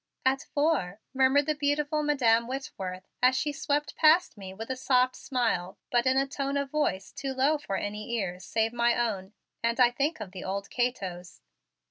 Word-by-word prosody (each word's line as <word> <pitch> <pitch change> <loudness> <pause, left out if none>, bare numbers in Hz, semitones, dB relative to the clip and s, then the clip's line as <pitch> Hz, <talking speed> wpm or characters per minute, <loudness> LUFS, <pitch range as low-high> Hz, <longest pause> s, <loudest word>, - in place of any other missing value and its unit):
"At 265 +1 +3
four," 285 - +1
murmured 265 +2 +4
the 305 - +1
beautiful 295 +1 0
Madam 235 -6 +3
Whitworth 195 -9 -5
as 255 +1 +5
she 295 - 0
swept 295 +1 -1
past 320 0 +4
me 195 -3 -8
with 225 +6 -6
a - - -1
soft 255 -1 +2
smile 225 -9 -1
but 240 +1 +2
in 260 +1 +3
a 270 - +3
tone 275 0 -2
of 280 -1 -2
voice 200 -11 -1
too 270 -1 -4
low 285 +4 +2
for 195 - -4
any 210 +2 -4
ears 185 -5 -2
save 225 +4 0
my 235 0 +2
own 210 -5 -2 0.3
and 230 +2 0
I 245 -1 +6
think 285 +5 -1
of 205 -4 -7
the 185 - -8
old 200 +1 -4
Cato's. 190 -8 -3
250 Hz, 185 wpm, -28 LUFS, 205-280 Hz, 0.3 s, I